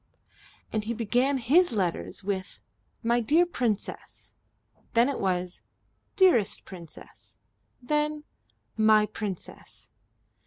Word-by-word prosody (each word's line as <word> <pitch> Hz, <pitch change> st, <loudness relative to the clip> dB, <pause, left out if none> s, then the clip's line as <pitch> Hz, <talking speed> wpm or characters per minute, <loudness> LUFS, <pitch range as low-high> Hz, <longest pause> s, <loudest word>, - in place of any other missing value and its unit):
And 215 Hz, -1 st, -1 dB
he 235 Hz, +2 st, -2 dB
began 245 Hz, +5 st, +1 dB
his 290 Hz, +7 st, +3 dB
letters 170 Hz, -, -2 dB
with 190 Hz, -1 st, -4 dB, 0.4 s
"My 235 Hz, +1 st, +2 dB
dear 305 Hz, +10 st, +3 dB
Princess;" 240 Hz, -, -4 dB, 0.6 s
then 235 Hz, +2 st, +4 dB
it 280 Hz, -, -2 dB
was 180 Hz, -2 st, -2 dB, 0.5 s
"Dearest 240 Hz, -, +3 dB
Princess;" 170 Hz, -4 st, -12 dB, 0.5 s
then 300 Hz, +2 st, -1 dB, 0.5 s
"My 215 Hz, -1 st, +5 dB
Princess." 205 Hz, -4 st, -8 dB
225 Hz, 95 wpm, -27 LUFS, 195-275 Hz, 0.6 s, My